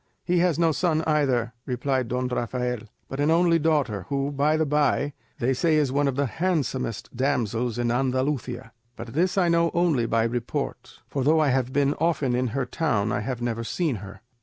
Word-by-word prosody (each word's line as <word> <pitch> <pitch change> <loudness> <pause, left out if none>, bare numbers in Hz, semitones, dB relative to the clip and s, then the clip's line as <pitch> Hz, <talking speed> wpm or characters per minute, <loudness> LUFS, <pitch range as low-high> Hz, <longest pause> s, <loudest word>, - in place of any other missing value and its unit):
"He 180 -1 +1
has 175 -3 +2
no 165 -1 +3
son 160 0 +1
either," 135 -7 +1
replied 130 0 -1
Don 125 +2 -1
Rafael, 125 0 -2 0.3
"but 135 - -6
an 145 +2 +2
only 165 0 +4
daughter, 140 - 0
who, 140 0 -1
by 145 +2 +2
the 160 - +2
bye, 145 -1 +1 0.2
they 135 -1 +1
say 155 +5 +2
is 145 -4 +2
one 140 +1 +2
of 135 - -1
the 140 +1 +1
handsomest 135 - -2
damsels 120 -3 0
in 120 -1 0
Andalusia; 130 -1 -1 0.2
but 115 - -8
this 180 +6 +1
I 180 -2 +4
know 170 0 +3
only 160 -9 +2
by 115 0 +2
report; 120 +1 -4
for 135 - -2
though 155 +4 +4
I 155 -2 +3
have 130 -1 +1
been 140 +1 +2
often 155 -6 +1
in 125 +1 +1
her 130 +3 -2
town 115 -7 0
I 100 - 0
have 120 +3 -4
never 115 -1 -2
seen 150 +1 -1
her." 100 +1 -10
135 Hz, 195 wpm, -25 LUFS, 120-155 Hz, 0.3 s, only